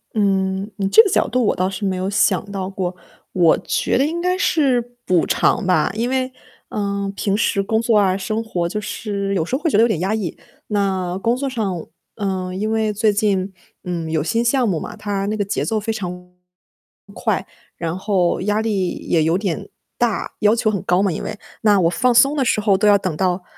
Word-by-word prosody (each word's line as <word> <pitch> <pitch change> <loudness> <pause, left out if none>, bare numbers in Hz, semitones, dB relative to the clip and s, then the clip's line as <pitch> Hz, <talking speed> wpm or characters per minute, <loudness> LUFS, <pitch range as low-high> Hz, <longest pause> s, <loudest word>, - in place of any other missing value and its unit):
嗯， 195 -1 +1
你 195 -2 0
这 - - +9
个 400 - 0
角 - - +2
度 250 +2 +1
我 - - +2
倒 185 +1 0
是 195 +1 -4
没 190 - 0
有 185 +1 -2
想 195 +2 +2
到 190 -1 -3
过， 185 -2 -3 0.4
我 170 -3 +4
觉 - - 0
得 270 - +3
应 330 +3 -2
该 360 +1 0
是 275 -10 +2 0.2
补 180 -2 +2
偿 220 - +1
吧。 180 -4 +2
因 230 +4 -1
为， 260 0 -1 0.4
呃， 200 -1 -2
平 200 0 0
时 200 -2 +1
工 220 +3 +1
作 230 -2 +3
啊， 195 -2 +3
生 215 +3 -2
活 175 -6 -2
就 210 +4 -3
是 200 -1 -3
有 160 - 0
时 245 - -2
候 275 - -3
会 330 - +1
觉 - - +3
得 - - +6
有 - - +5
点 205 -8 -1
压 190 +3 0
抑。 205 -7 -3 0.3
那 190 -3 -1
工 235 +4 +1
作 275 0 -2
上， 200 -9 -3 0.3
呃， 190 -3 -3
因 210 +4 -2
为 220 -1 +1
最 210 0 +2
近， 200 -2 0 0.3
嗯， 170 -3 -3
有 160 -1 +1
新 230 +9 0
项 240 0 +2
目 175 -5 0
嘛， - - -7
它 200 -1 -2
那 215 +1 -1
个 205 - 0
节 200 - -2
奏 220 -1 0
非 220 +2 -2
常 190 -5 -4 0.2
快， - - -29 1.5
然 170 +1 -3
后 190 -3 +1
压 210 +2 +1
力 205 -5 0 0.2
也 165 - +3
有 165 +2 +2
点 195 -5 -3 0.3
大， 240 -3 0
要 210 +1 +4
求 220 -1 +1
很 200 -3 -2
高 180 +2 +2
嘛， 200 - +2
因 - - -4
为。 215 - -5 0.3
那 205 -3 +4
我 170 -2 +3
放 250 +6 +2
松 275 +5 +5
的 275 - +2
时 225 - +1
候 205 -2 +3
都 210 - +2
要 205 - +7
等 185 -5 -3
到， 180 +1 0
200 Hz, 240 characters per minute, -20 LUFS, 185-225 Hz, 1.5 s, 这